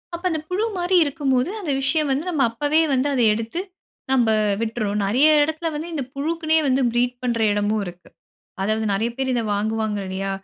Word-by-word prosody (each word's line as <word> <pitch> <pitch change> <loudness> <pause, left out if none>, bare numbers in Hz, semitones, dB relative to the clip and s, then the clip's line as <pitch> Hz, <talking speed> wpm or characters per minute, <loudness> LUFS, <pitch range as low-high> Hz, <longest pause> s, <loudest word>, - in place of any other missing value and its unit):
அப்ப, 345 - -10
அந்த 315 -2 -1
புழு 385 +4 0
மாரி 355 +1 +1
இருக்கும் 285 -2 -2
போது, 255 +6 +1
அந்த 325 -8 -3
விஷயம் 300 +1 +2
வந்து, 275 +4 0
நம்ம 305 -6 -1
அப்பவே 290 +7 +1
வந்து 260 +2 +1
அத 250 - +1
எடுத்து, 230 +9 -4 0.5
நம்ப 245 -4 +3 0.3
விட்டுர்றோம். 220 -2 -2
நெறைய 255 +10 +4
எடத்தில 315 +2 -1
வந்து 315 +3 -4
இந்த 285 -4 -2
புழுக்குனே 320 +2 0
வந்து 265 +1 +2
ப்ரீட் 245 +1 +1
பண்ற 235 -2 -1
எடமும் 205 0 0
இருக்கு. 175 0 -11 0.5
அதாவது 215 +2 0
நெறைய 225 +4 0
பேரு 265 -1 -1
இத 235 - 0
வாங்குவாங்க 215 0 -1
இல்லையா? 195 +1 -3
260 Hz, 185 wpm, -22 LUFS, 220-310 Hz, 0.5 s, நெறைய